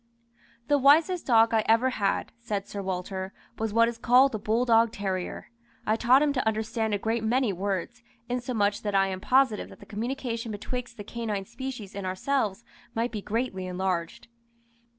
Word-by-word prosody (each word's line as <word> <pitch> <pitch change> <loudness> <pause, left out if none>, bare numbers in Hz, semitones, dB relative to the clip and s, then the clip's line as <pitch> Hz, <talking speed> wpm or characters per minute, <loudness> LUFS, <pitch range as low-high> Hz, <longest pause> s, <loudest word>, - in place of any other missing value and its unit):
"The 290 -1 +3
wisest 320 +6 +4
dog 230 -2 +5
I 220 -1 +3
ever 230 +4 +4
had," 200 -5 -1
said 210 -4 -3
Sir 200 - -5
Walter, 190 0 -4 0.3
"was 220 -1 -1
what 230 +2 +4
is 235 -1 -4
called 250 +3 +5
the 220 - -3
bulldog 225 +1 +3
terrier. 190 0 -4 0.3
I 215 - +2
taught 250 +5 +5
him 290 -1 +2
to 255 -4 -1
understand 220 0 0
a - - 0
great 225 +2 -1
many 235 -1 +1
words, 195 +5 -3 0.3
insomuch 245 -5 0
that 205 -2 -2
I 195 0 +3
am 185 0 -5
positive 260 -3 +2
that - - -14
the - - -13
communication 230 +1 -4
betwixt 240 +3 -5
the 205 - -6
canine 215 -3 -4
species 235 -3 -7
and 200 -2 -4
ourselves 210 +2 -1 0.3
might 230 +2 0
be 215 -2 -4
greatly 205 -4 -2
enlarged. 180 -2 -3
225 Hz, 170 wpm, -27 LUFS, 200-245 Hz, 0.3 s, dog